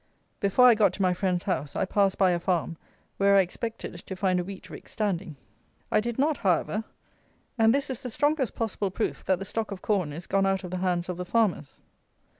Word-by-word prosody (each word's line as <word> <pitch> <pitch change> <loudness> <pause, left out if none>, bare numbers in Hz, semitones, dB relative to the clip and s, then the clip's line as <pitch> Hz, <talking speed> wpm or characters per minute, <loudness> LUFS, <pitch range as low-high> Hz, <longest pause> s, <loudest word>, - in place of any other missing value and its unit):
Before 200 +6 +4
I 245 - +9
got 215 -1 +3
to - - -5
my 180 -1 +3
friend's 180 -1 -1
house, 150 -7 -2
I - - +1
passed 195 0 +1
by 190 -2 +4
a 175 - 0
farm 170 -1 -1 0.4
where 200 0 +4
I 195 - +7
expected 205 +1 -5
to 190 - -6
find 185 -1 +1
a - - -1
wheat 190 +1 -9
rick - - -11
standing. 195 -6 -2 0.6
I - - +4
did 235 +1 -3
not, 295 +2 +2
however; 200 +4 0 0.7
and 225 -2 +4
this 275 +2 +1
is 260 -3 -4
the 250 - -4
strongest 290 +1 0
possible 210 -3 -2
proof 215 +4 -3
that 190 - +2
the 195 - -6
stock 220 +3 -3
of 195 -3 -7
corn 190 -8 0
is 165 +4 -7
gone 195 0 +1
out 195 0 0
of 180 - -7
the 185 - -2
hands 180 -1 0
of 180 -1 -4
the 180 - -4
farmers. 200 -8 0
195 Hz, 225 wpm, -27 LUFS, 180-220 Hz, 0.7 s, I